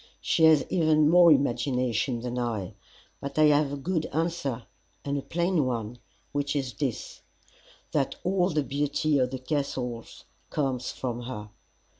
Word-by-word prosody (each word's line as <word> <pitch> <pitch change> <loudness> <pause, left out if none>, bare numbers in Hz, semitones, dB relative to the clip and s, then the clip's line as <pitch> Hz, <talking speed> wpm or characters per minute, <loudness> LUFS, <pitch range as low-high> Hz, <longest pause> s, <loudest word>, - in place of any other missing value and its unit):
She 160 - +3
has 155 -2 +5
even 155 -3 +3
more 175 -1 +7
imagination 125 -3 +1
than 125 0 -3
I. 110 -6 -3 0.5
But 140 - -7
I 155 - +5
have 145 -1 +1
a 145 - -3
good 160 +3 -1
answer 155 -6 -2 0.4
and 140 0 -1
a 140 - -1
plain 170 +1 0
one, 120 -2 -3 0.3
which 145 0 -1
is 135 -4 -2
this, 100 - -4 0.7
that 140 -3 0
all 185 0 +2
the 155 -4 0
beauty 145 +1 0
of 125 -1 +2
the 130 - -4
Castle 130 -3 -3 0.5
comes 130 -4 -1
from 120 -2 -4
her. 105 -4 -7
140 Hz, 150 wpm, -27 LUFS, 125-155 Hz, 0.7 s, more